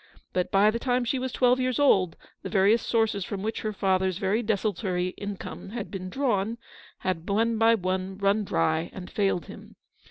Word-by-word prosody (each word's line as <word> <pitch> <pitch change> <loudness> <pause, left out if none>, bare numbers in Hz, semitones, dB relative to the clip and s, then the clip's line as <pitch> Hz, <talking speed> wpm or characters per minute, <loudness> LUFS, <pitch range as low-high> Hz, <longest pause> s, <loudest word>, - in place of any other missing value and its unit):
But 180 0 0
by 200 +3 +4
the 230 - -3
time 250 0 0
she 255 +2 0
was 260 0 -3
twelve 250 0 +3
years 255 -1 0
old 190 - +3 0.3
the - - -6
various 210 +3 +4
sources 225 -4 +1
from 195 +1 -5
which 220 +1 -2
her 215 - -2
father's 190 -2 +1
very 200 +4 +1
desultory 195 -4 -1
income 200 0 -7
had 225 -1 -6
been 185 -2 -5
drawn 230 -3 0 0.4
had 185 -2 -3
one 225 +2 +1
by 225 0 +5
one 185 -1 -2
run 200 +2 +2
dry 160 - 0
and 180 -1 -8
failed 195 -6 0
him. - - -12
200 Hz, 185 wpm, -27 LUFS, 185-230 Hz, 0.4 s, by